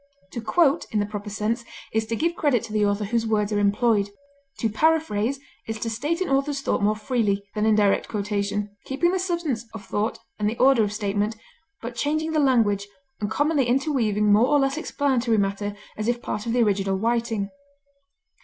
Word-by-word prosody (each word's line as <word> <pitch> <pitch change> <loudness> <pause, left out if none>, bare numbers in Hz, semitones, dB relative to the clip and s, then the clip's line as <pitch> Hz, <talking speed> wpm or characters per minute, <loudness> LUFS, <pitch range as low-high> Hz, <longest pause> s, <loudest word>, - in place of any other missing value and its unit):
To 235 - -5
quote, 285 +7 +2
in 215 - +1
the 205 - +1
proper 205 0 -6
sense, 215 +3 -1 0.3
is 220 0 0
to 230 - -1
give 335 +8 0
credit 275 -9 +2
to 220 -2 -7
the 215 -1 +2
author 205 +1 +1
whose 230 +2 0
words 210 -1 +1
are 205 - +2
employed. 205 0 +2 0.5
To 225 - 0
paraphrase 270 -1 +1 0.3
is 225 0 -3
to 225 +1 -2
state 295 +10 -2
an 370 - 0
author's 275 +1 0
thought - - 0
more 210 +1 +2
freely 215 -3 0
than 210 0 0
in - - +4
indirect 205 -2 +2
quotation, 205 -1 -2
keeping 315 +6 +1
the 375 - 0
substance 340 -10 -1
of 205 -3 -8
thought 210 +3 -1 0.2
and 210 0 +1
the 225 - -5
order 260 -3 +5
of 205 - -1
statement, 210 +1 -1 0.5
but 235 +1 -4
changing 310 +5 -1
the 310 - +1
language, 225 -8 +2 0.3
and 205 - -2
commonly 290 +3 +2
interweaving 240 -6 +2
more 220 +4 +5
or 290 +1 +4
less 270 0 +1
explanatory 260 -7 0
matter 200 0 -1 0.2
as 215 +1 -3
if 240 0 +1
part 210 -1 -4
of 230 - 0
the 245 -1 +4
original 195 -2 +1
writing. 225 -2 -1
225 Hz, 195 wpm, -24 LUFS, 205-270 Hz, 0.5 s, order